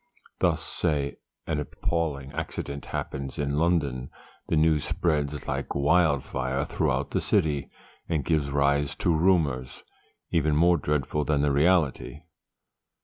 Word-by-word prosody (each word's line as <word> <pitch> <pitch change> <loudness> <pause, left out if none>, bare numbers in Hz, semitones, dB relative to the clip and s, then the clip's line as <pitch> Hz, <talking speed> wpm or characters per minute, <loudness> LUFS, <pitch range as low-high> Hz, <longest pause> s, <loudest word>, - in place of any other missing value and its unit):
Thus, - - +1
say, 75 -5 -1 0.3
an 80 -2 -1
appalling 75 -2 -2
accident 70 0 -5
happens 70 0 -4
in 70 -1 -1
London; 75 -6 0 0.4
the - - +1
news 80 -1 +3
spreads 75 -2 -1
like - - -3
wildfire 70 -3 +1
throughout - - -1
the - - 0
city, 75 -3 +1 0.4
and 80 -5 0
gives 75 -4 +1
rise 70 0 +1
to 85 - +1
rumours, 75 -8 +1 0.5
even 75 -2 +2
more 85 +3 +5
dreadful 75 0 -1
than 75 -1 +1
the 75 - +2
reality. 75 0 +1
75 Hz, 125 wpm, -27 LUFS, 70-80 Hz, 0.5 s, more